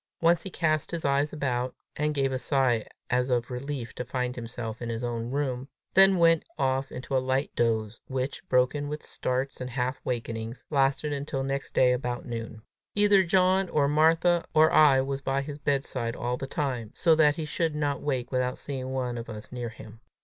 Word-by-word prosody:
Once 170 Hz, 0 st, +4 dB
he 190 Hz, -, -5 dB
cast 155 Hz, -4 st, 0 dB
his 170 Hz, -1 st, -4 dB
eyes 140 Hz, +1 st, +2 dB
about, 130 Hz, -4 st, -2 dB, 0.2 s
and 150 Hz, 0 st, 0 dB
gave 135 Hz, -1 st, +1 dB
a 130 Hz, -, -1 dB
sigh 130 Hz, -5 st, +2 dB, 0.3 s
as 125 Hz, +1 st, +2 dB
of 125 Hz, 0 st, 0 dB
relief 125 Hz, -1 st, -4 dB
to -, -, -4 dB
find 125 Hz, 0 st, -2 dB
himself 115 Hz, -1 st, -6 dB
in 120 Hz, -, -4 dB
his 115 Hz, +1 st, -3 dB
own 120 Hz, -1 st, -3 dB
room, 130 Hz, -1 st, -2 dB, 0.3 s
then 195 Hz, 0 st, +7 dB
went 165 Hz, -1 st, +5 dB
off 135 Hz, -1 st, 0 dB
into 135 Hz, +1 st, -4 dB
a 130 Hz, -, +3 dB
light 130 Hz, +2 st, 0 dB
doze, 110 Hz, -1 st, 0 dB
which, 130 Hz, +3 st, -3 dB
broken 130 Hz, +3 st, +2 dB
with 150 Hz, +1 st, -5 dB
starts 130 Hz, +2 st, -2 dB
and 125 Hz, -, -4 dB
half 125 Hz, +1 st, -2 dB
wakings, 115 Hz, -1 st, -4 dB
lasted 140 Hz, +1 st, +1 dB
until 140 Hz, -1 st, -3 dB
next 135 Hz, +1 st, -3 dB
day 125 Hz, -1 st, +5 dB
about 125 Hz, -1 st, -3 dB
noon. 115 Hz, -2 st, -6 dB, 0.3 s
Either 205 Hz, -1 st, +5 dB
John 185 Hz, +1 st, +3 dB
or 145 Hz, -2 st, +2 dB
Martha 165 Hz, +3 st, +3 dB
or 155 Hz, 0 st, +6 dB
I 140 Hz, -4 st, +6 dB
was 135 Hz, +1 st, -3 dB
by 135 Hz, 0 st, 0 dB
his 145 Hz, 0 st, -7 dB
bedside 135 Hz, -5 st, -1 dB
all 120 Hz, +1 st, -2 dB
the 135 Hz, -, -5 dB
time, 125 Hz, -7 st, -2 dB
so 165 Hz, -2 st, +4 dB
that 150 Hz, -2 st, +4 dB
he 160 Hz, -, -3 dB
should 160 Hz, +1 st, -1 dB
not 145 Hz, -2 st, -1 dB
wake 130 Hz, -4 st, -2 dB
without 125 Hz, 0 st, 0 dB
seeing 130 Hz, -2 st, -5 dB
one 125 Hz, -2 st, -2 dB
of 115 Hz, -, -8 dB
us 105 Hz, -1 st, -8 dB
near 120 Hz, -2 st, -4 dB
him. 110 Hz, 0 st, -12 dB
135 Hz, 195 wpm, -27 LUFS, 125-150 Hz, 0.3 s, then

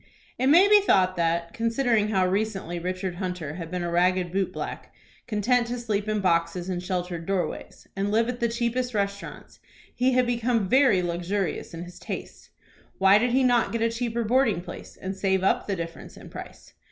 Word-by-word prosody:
It 260 Hz, -, +2 dB
may 345 Hz, +8 st, +7 dB
be 415 Hz, 0 st, +7 dB
thought 185 Hz, -, +3 dB
that, 170 Hz, 0 st, 0 dB
considering 230 Hz, -1 st, +1 dB
how 190 Hz, -3 st, +2 dB
recently 195 Hz, -3 st, -2 dB
Richard 185 Hz, 0 st, -3 dB
Hunter 180 Hz, -5 st, -4 dB
had 165 Hz, -3 st, -6 dB
been 180 Hz, 0 st, -3 dB
a 170 Hz, -, -2 dB
ragged 180 Hz, 0 st, +2 dB
boot 195 Hz, +1 st, 0 dB
black, -, -, -6 dB, 0.4 s
content 235 Hz, +2 st, +1 dB
to 245 Hz, +1 st, -3 dB
sleep 215 Hz, -3 st, -2 dB
in 215 Hz, -1 st, 0 dB
boxes 175 Hz, 0 st, 0 dB
and 180 Hz, -1 st, -2 dB
sheltered 180 Hz, -2 st, -3 dB
doorways, 195 Hz, -2 st, -3 dB
and 195 Hz, +1 st, -1 dB
live 225 Hz, +2 st, +2 dB
at 245 Hz, 0 st, -4 dB
the 235 Hz, -, +1 dB
cheapest 240 Hz, +1 st, -1 dB
restaurants, 200 Hz, 0 st, -4 dB, 0.3 s
he 255 Hz, +1 st, +2 dB
had 255 Hz, 0 st, +3 dB
become 235 Hz, -3 st, 0 dB
very 255 Hz, -5 st, +4 dB
luxurious 175 Hz, +1 st, -2 dB
in 165 Hz, -, -6 dB
his 175 Hz, 0 st, -11 dB
tastes. -, -, -7 dB, 0.5 s
Why 195 Hz, +2 st, +6 dB
did 245 Hz, +3 st, +1 dB
he 260 Hz, +2 st, +3 dB
not 245 Hz, -2 st, +3 dB
get 230 Hz, -1 st, -1 dB
a 230 Hz, -, +2 dB
cheaper 235 Hz, 0 st, -2 dB
boarding 230 Hz, -5 st, +2 dB
place, 175 Hz, -1 st, -10 dB
and 190 Hz, +1 st, -4 dB
save 190 Hz, -1 st, 0 dB
up 195 Hz, -, +1 dB
the 200 Hz, -, -1 dB
difference 170 Hz, -1 st, -7 dB
in -, -, -12 dB
price? -, -, -10 dB
200 Hz, 190 wpm, -26 LUFS, 180-235 Hz, 0.5 s, may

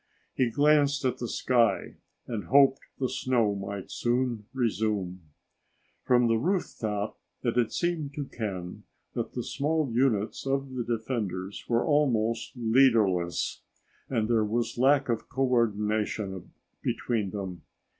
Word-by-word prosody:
He 125 Hz, -2 st, +1 dB
glanced 145 Hz, +1 st, +3 dB
at 130 Hz, -, 0 dB
the 120 Hz, -, -3 dB
sky 115 Hz, -4 st, +1 dB, 0.3 s
and 110 Hz, -4 st, -4 dB
hoped 135 Hz, +1 st, +5 dB, 0.2 s
the 130 Hz, -, 0 dB
snow 125 Hz, -5 st, +1 dB
might 100 Hz, -1 st, -6 dB
soon 120 Hz, -3 st, -1 dB
resume. 105 Hz, -7 st, -1 dB, 0.8 s
From 125 Hz, -1 st, +4 dB
the 115 Hz, -1 st, +2 dB
rooftop, 110 Hz, -, -2 dB, 0.2 s
it 120 Hz, -2 st, 0 dB
had 120 Hz, -2 st, +2 dB
seemed 160 Hz, -5 st, -1 dB
to 145 Hz, -3 st, -3 dB
Ken 95 Hz, -8 st, -5 dB, 0.3 s
that -, -, -3 dB
the -, -, -3 dB
small 150 Hz, -1 st, -1 dB
units 120 Hz, -1 st, +1 dB
of 135 Hz, 0 st, -1 dB
the 125 Hz, -2 st, -2 dB
defenders 110 Hz, -5 st, -3 dB
were 115 Hz, 0 st, +2 dB
almost 120 Hz, -7 st, +1 dB
leaderless, 110 Hz, -8 st, +2 dB, 0.5 s
and 115 Hz, -4 st, 0 dB
there 115 Hz, -2 st, +3 dB
was 115 Hz, +2 st, -1 dB
lack 135 Hz, +2 st, +4 dB
of 115 Hz, -2 st, -2 dB
co 135 Hz, -, 0 dB
ordination 105 Hz, -5 st, 0 dB, 0.3 s
between 110 Hz, -5 st, -1 dB
them. 95 Hz, -4 st, -5 dB
115 Hz, 130 wpm, -28 LUFS, 105-130 Hz, 0.8 s, hoped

